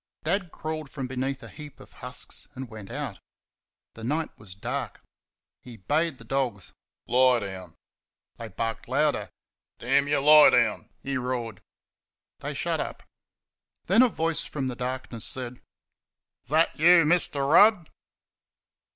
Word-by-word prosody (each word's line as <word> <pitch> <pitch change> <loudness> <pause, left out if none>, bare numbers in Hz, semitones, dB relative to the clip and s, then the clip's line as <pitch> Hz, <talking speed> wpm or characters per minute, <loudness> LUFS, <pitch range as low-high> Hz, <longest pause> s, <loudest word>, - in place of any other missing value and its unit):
Dad 180 +1 -1
crawled 155 -2 -5
from 135 -2 -5
beneath 130 +1 -3
a - - -9
heap 150 -3 -12
of - - -16
husks 125 0 -5
and 130 0 -6
went 105 -3 -10
out. - - -5 0.7
The 115 - -11
night 150 +6 -2
was 100 -4 -11
dark. 100 - -4 0.6
He 120 -2 -12
bade 150 - 0
the 115 - -13
dogs 120 -6 -2 0.3
"Lie 125 0 +4
down." 95 -3 -8 0.6
They 115 - -7
barked 115 +3 -4
louder. - - 0 0.5
"Damn 135 +4 +1
you 145 0 +2
lie 150 +2 +8
down!" - - +1
he 135 0 -2
roared. 125 -4 -4 0.8
They - - -5
shut - - -1
up. - - -5 0.8
Then 195 +7 +5
a 255 - +5
voice 165 -5 -1
from 135 -3 -4
the 125 - -5
darkness 125 -2 -5
said: 125 -1 -5 0.8
"Is - - -19
that 155 +2 +2
you, 170 +1 +7
Mr. 150 -4 +3
Rudd?" 185 +2 +5
130 Hz, 140 wpm, -26 LUFS, 120-155 Hz, 0.8 s, lie